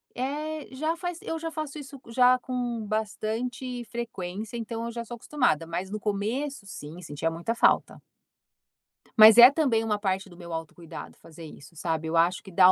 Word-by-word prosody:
É, 300 +4 -3
já 310 +5 -1
faz 350 -1 -4
eu 325 - -4
já 330 0 -3
faço 310 -2 -5
isso 275 -1 -10
já 250 +2 +5
com 245 -3 -3
bastante 230 +4 -3
frequência, 215 -2 -5
então 230 0 -4
eu 235 - -4
já 235 0 -5
sou 240 - -7
acostumada, 235 - 0
mas 175 +3 -4
no 215 +1 -4
começo, 215 +6 -2
sim, 165 -2 -9
sentia 160 0 -3
muita 170 +8 -3
falta. - - +2 1.2
Mas 220 +1 +10
é 245 +2 +11
também 270 -7 +2
uma 210 -2 0
parte 195 -1 -1
do 175 - -15
meu 170 -2 -8
autocuidado 165 +1 -8
fazer 165 +1 -13
isso, 150 +1 -13
sabe, 160 0 -2
eu 165 +1 0
acho 175 +3 +2
que 195 - -12
dá 185 +1 +7
225 Hz, 180 wpm, -27 LUFS, 180-255 Hz, 1.2 s, é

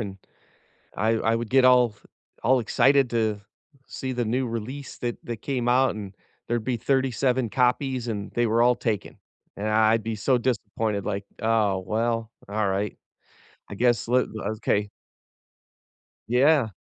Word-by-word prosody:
and 100 -3 -6 0.8
I 110 - +1
I 115 0 +1
would 115 -1 -4
get 130 -1 +5
all 125 -3 +5 0.5
all 130 +3 +4
excited 135 +2 +3
to 110 -3 0 0.5
see 130 -1 -5
the 120 -1 -1
new 125 +4 0
release 125 +5 -6
that 120 -1 -3
that 120 - -4
came 125 -4 -1
out, 130 +2 +3
and 100 -2 -7 0.3
there'd 120 -2 -1
be 125 -1 0
37 130 -1 +1
copies, 125 0 0
and 105 -2 -4
they 120 0 +1
were 115 +2 +2
all 125 0 +5
taken. 110 -5 -3 0.4
And 105 +2 -3
I 110 0 +4
I'd 115 -1 +1
be 115 -1 -3
so 130 +5 +2
disappointed, 110 -4 -2
like, 100 -1 -3 0.2
"Oh, 110 -4 +2
well, 115 +1 -1 0.2
alright. 100 -1 -1 0.7
I - - -5
guess 120 0 +1
loo" 125 +1 +4 0.2
l 105 - -1
okay. 105 -2 0 1.4
Yeah. 130 +1 +4
115 Hz, 155 wpm, -25 LUFS, 110-125 Hz, 1.4 s, get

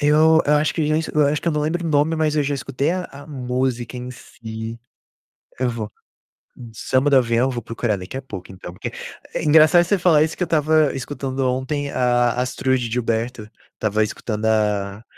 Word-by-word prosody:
eu 155 +2 +5
eu 150 - +4
acho 150 +1 +2
que 160 -3 0
já 155 +1 +2
es 160 - -1
eu 150 -1 +2
acho 150 +1 0
que - - 0
eu - - +1
não 150 - 0
lembro 165 +4 -1
o - - -1
nome, 150 +2 +2
mas 155 -1 +1
eu 150 - +3
já 140 0 -1
escutei 135 +2 -2
a 180 +1 -2
a 140 +1 -11
música 125 -3 -2
em 125 0 -6
si. 115 -2 -8 0.8
Eu 130 0 +1
vou 110 -3 -4 0.8
samba 130 +5 +1
do 140 - +4
avião, 120 +1 +2
vou 120 -2 -3
procurar 115 -2 -2
daqui 95 +7 -7
a 135 - -5
pouco, 95 -10 -9
então, 90 -2 -10
porque - - -6 0.4
é - - -2
engraçado 155 +3 +6
você 200 +3 +2
falar 170 -4 +4
isso, 160 0 -2
que 180 - 0
eu - - +1
estava 155 -2 +2
escutando 135 0 -5
ontem 140 +3 -2
a 120 -1 +2
Astrud 125 -1 -1
Gilberto, 115 -1 -2 0.3
estava 110 0 0
escutando 105 0 -4
a 105 -2 0
130 Hz, 200 wpm, -21 LUFS, 115-150 Hz, 0.8 s, engraçado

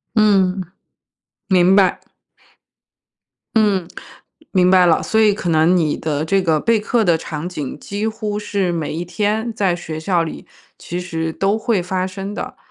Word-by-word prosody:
嗯。 195 -3 +3 0.9
明 185 -1 +4
白。 195 -2 +3 1.6
嗯， 205 -6 +2 0.7
明 180 -2 +3
白 185 -1 +6
了。 165 -2 +3
所 220 - 0
以 210 -2 +5
可 180 -4 -4
能 160 +3 +4
你 155 -3 +1
的 155 -1 -2
这 195 +4 +2
个 160 -4 +1
备 230 +4 +2
课 220 +1 0
的 170 -2 +3
场 160 +1 -5
景 150 -6 -6
几 205 +6 -4
乎 215 -1 -3
是 200 -3 -1
每 160 -3 -3
一 170 +2 -4
天 215 +6 -1
在 195 -4 +1
学 160 -2 -7
校 170 +1 +1
里 165 - -7 0.3
其 175 +1 -5
实 165 -2 -3
都 195 +5 0
会 220 -4 0
发 185 +1 -2
生 195 +2 -6
的， - - -6
185 Hz, 175 characters per minute, -19 LUFS, 170-205 Hz, 1.6 s, 白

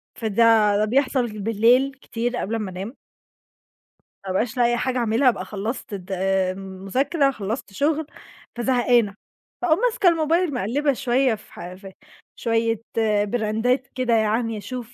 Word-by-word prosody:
فده 220 -1 +3
ده 210 - +2
بيحصل 245 -2 0
بالليل 235 +5 +3
كتير 240 +1 -3
قبل 225 0 -2
امّا 210 -4 -3
أنام. 195 +8 -6 1.0
ما 195 - -10
بابقاش 225 +6 -1
لاقية 240 -1 +3
حاجة 255 +2 -1
أعملها، 235 +2 +3
ابقى 240 - -3
خلّصت 215 +2 -5
الد 190 -1 -7
المذاكرة، 195 - 0
خلّصت 215 -2 -5
شُغل، 300 +6 0 0.5
فزهقانة. 240 -4 +2 0.5
فأقوم 340 -2 +2
ماسكة 450 -6 +3
الموبايل 330 0 +1
مَقلّبة 270 +5 0
شوية 255 -1 +1
في 215 - -18
ح 175 +1 -8
في 190 +1 -12 0.4
شوية 225 -1 0 0.4
براندات 235 +4 0
كده 255 -2 0
يعني 225 +1 +1
أشوف 245 +2 -7
230 Hz, 135 wpm, -23 LUFS, 210-260 Hz, 1.0 s, فده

